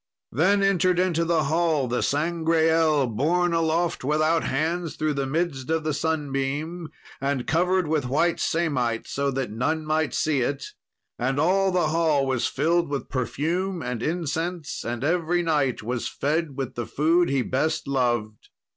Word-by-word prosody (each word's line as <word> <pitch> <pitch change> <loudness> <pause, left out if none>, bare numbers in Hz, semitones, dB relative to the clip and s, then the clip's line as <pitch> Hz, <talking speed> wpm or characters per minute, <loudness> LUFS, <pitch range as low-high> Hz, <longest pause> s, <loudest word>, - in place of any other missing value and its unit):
Then 195 - +3
entered 185 -2 +3
into 175 -2 +1
the 165 -2 +2
hall 155 -2 +1
the 125 +1 -1
Sangreal, 160 -1 +2
borne 165 +10 +1
aloft 165 0 0
without 155 +4 +2
hands 165 +4 -1
through 155 -1 0
the 140 -1 -2
midst 150 -3 -2
of 160 -1 0
the 155 -1 -1
sunbeam, 150 +2 -2 0.3
and 135 -2 -1
covered 180 +3 +2
with 150 -4 0
white 160 +6 +1
samite, 130 -9 0
so 140 0 -1
that 130 -4 -3
none 155 +8 -1
might 155 0 0
see 150 -4 +1
it. 135 +3 -3 0.5
And 135 +3 0
all 190 +4 +3
the 180 -4 +1
hall 155 -4 +2
was 130 -3 0
filled 165 +3 +1
with 140 -3 -4
perfume 170 +8 -2
and 125 -2 -3
incense, 165 +1 -3
and 120 +1 -4
every 175 +2 +1
knight 145 -8 0
was 120 +1 -2
fed 150 -1 -2
with 135 -2 -3
the 120 -1 -4
food 165 +4 +2
he 135 -2 +1
best 155 +6 -1
loved. 120 -6 -1
155 Hz, 155 wpm, -25 LUFS, 135-170 Hz, 0.5 s, Then